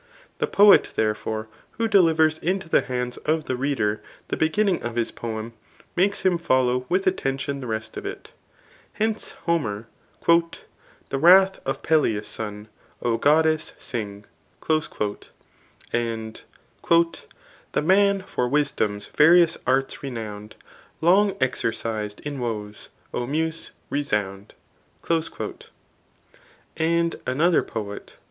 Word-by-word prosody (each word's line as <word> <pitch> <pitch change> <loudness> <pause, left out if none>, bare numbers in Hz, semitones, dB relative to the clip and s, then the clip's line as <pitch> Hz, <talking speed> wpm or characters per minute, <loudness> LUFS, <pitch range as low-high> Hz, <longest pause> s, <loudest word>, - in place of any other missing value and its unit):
The - - +1
poet, 205 0 +6
therefore, 110 0 -1 0.3
who 230 - -1
delivers 160 -6 +4
into 190 +1 -1
the - - +3
hands 125 -1 -3
of 155 +1 -1
the 130 - -1
reader 125 -6 -1 0.3
the - - -1
beginning 190 +4 +1
of 120 -1 -4
his 120 -1 0
poem, 115 0 -5 0.4
makes 195 +3 +2
him 180 -3 +2
follow 125 -4 +1
with 185 +2 +1
attention 140 -6 -1
the 130 - -6
rest 110 -1 -4
of - - -5
it. - - -8 0.6
Hence, 220 0 -2
Homer, 115 -11 -1 0.4
And, 170 0 +3 0.5
The 135 - -2
torath 190 +4 +6
of 135 - -2
Peleus' 110 -10 +2
son, 105 0 -5 0.4
O 115 -1 +1
goddess, 155 +2 +2
sing. 105 -3 -5 0.4
The 160 - +4
manjor 110 -9 -2 2.5
tMsdom^s 150 - +1
wtrious 170 +2 +5
arts 135 +1 +1
renownM, 110 -5 -7 0.5
Long 195 +4 +4
exercis'd 115 -4 -2
in 145 -2 -5
woes, 105 -4 -5 0.2
O 120 - -2
Muse^ 160 +3 -1 0.2
resound. 105 -8 -2 2.2
And 170 +1 +1
another 155 +7 +3
poet. 105 -2 -7
135 Hz, 110 wpm, -24 LUFS, 110-170 Hz, 2.5 s, poet